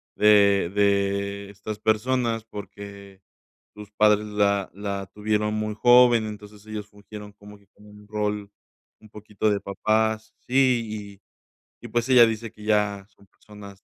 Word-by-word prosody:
de 100 -3 +4
de 100 0 0
estas 105 +1 -8
personas, 115 +1 0
porque 100 -2 -11 0.5
sus 105 0 -11
padres 105 0 +3
la 100 -2 0
la 100 -1 -5
tuvieron 105 0 -1
muy 110 0 -2
joven. 120 -1 +5
Entonces, 105 0 -11
ellos 105 -1 -7
fungieron 105 0 -12
como 105 0 -15
que 100 - -28
con 105 - -22
un 105 0 -16
rol, 105 -1 -3 0.5
un 110 - -17
poquito 105 0 -3
de 100 - 0
papás. 110 +2 -1
Sí, 115 -6 0 0.4
y - - -20
y - - -8
pues, 120 +3 -1
ella 125 -2 +8
dice 115 0 -4
que 105 - -15
ya 105 -2 0
son 100 0 -25
personas 100 -2 -14
105 Hz, 150 wpm, -24 LUFS, 100-110 Hz, 0.5 s, ella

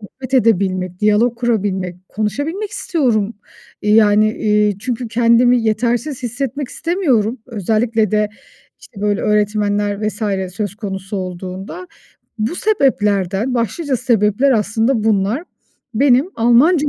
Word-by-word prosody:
sohbet 255 +5 -7
edebilmek, 185 -6 +1
diyalog 215 +3 +2
kurabilmek, 195 -7 -1
konuşabilmek 290 - -3
istiyorum. 235 - 0 0.5
Eee, 210 0 +3
yani, 215 0 +4
iii, 210 -2 +1
çünkü 240 +1 -4
kendimi 235 +1 +3
yetersiz 240 +5 -1
hissetmek 260 +3 -3
istemiyorum. 265 - 0
Özellikle 220 0 0
de, 210 0 +1 0.5
işte, 200 - -13
böyle 205 -1 +1
öğretmenler 210 0 0
vs. 195 -4 -3
söz 205 -1 -3
konusu 195 -1 -5
olduğunda. 185 - -6 0.5
Bu 220 +8 -1
sebeplerden 210 - +1
Başlıca 255 - -1
sebepler 235 +1 +2
aslında 220 +2 +1
bunlar. 215 - +1 0.5
Benim 270 - +3
Almanca 280 +7 +4
220 Hz, 110 wpm, -18 LUFS, 205-250 Hz, 0.5 s, yani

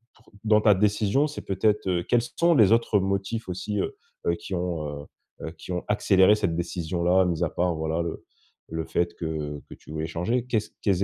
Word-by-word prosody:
pour 115 - -24
dans 105 -1 +4
ta 105 -1 +6
décision, 105 +7 +2
c'est 150 - -7
peut-être, 100 +1 +1
heu 90 -1 +1
quels 120 -1 +2
sont 170 +7 +2
les 110 -4 +6
autres 115 -3 +3
motifs 100 +4 -2
aussi, 100 +3 -3
heu - - -2 0.3
heu - - +3
qui 95 - -6
ont, 85 -4 -2 0.2
heu, - - -13 0.4
heu, - - -5
qui 90 - -9
ont 90 - -2
accéléré 105 -1 +4
cette 95 -6 -1
décision-là 85 +1 +1
mis 85 -3 0
à - - +1
part, 90 -1 0
voilà 80 +1 -1
le 85 - -6 0.4
le 80 0 -3
fait 85 0 -1
que, 85 - -6
heu, 75 -2 -4
que - - -9
tu - - -15
voulais 80 0 -3
changer? 100 +10 -1
Qu'est-ce 110 -4 -1
quels 100 -1 +2
95 Hz, 210 wpm, -26 LUFS, 85-105 Hz, 0.4 s, ta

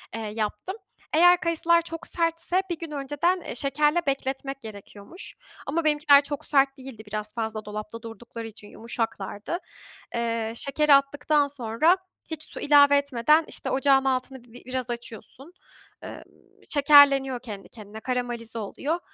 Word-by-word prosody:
eee, 225 - -4
yaptım. 215 - -4 0.4
Eğer 355 +3 +6
kayısılar 335 -1 +2
çok 330 -1 -8
sertse 335 +2 0
bir 345 - -3
gün 330 -2 -7
önceden, 295 +6 -1
eee, - - -6
şekerle 295 +5 +1
bekletmek 270 0 -3
gerekiyormuş. 210 - -11 0.3
Ama 325 +4 -1
benimkiler 295 -2 +5
çok 285 0 -6
sert 275 -1 +2
değildi 260 -5 -10
biraz 210 0 -4
fazla 220 -2 -4
dolapta 215 +2 -7
durdukları 230 0 -8
için 215 -1 -12
yumuşaklardı. 225 - -4 0.6
Eee, 230 -1 -1
şekeri 285 +4 +2
attıktan 285 +1 +3
sonra 280 +6 +1 0.3
hiç 315 -1 -4
su - - -8
ilave 285 -1 +6
etmeden, 280 +3 +3
işte, - - -5
ocağın 270 0 +3
altını 260 -1 -2
bi 245 0 -14
biraz 255 -1 -4
açıyorsun. 240 - -9 0.5
Eee, - - -8 0.5
şekerleniyor 280 -3 +5
kendi 210 -5 -9
kendine, 215 -1 -11
karamelize 240 -2 -3
oluyor. 285 - -3
270 Hz, 140 wpm, -25 LUFS, 230-300 Hz, 0.6 s, Eğer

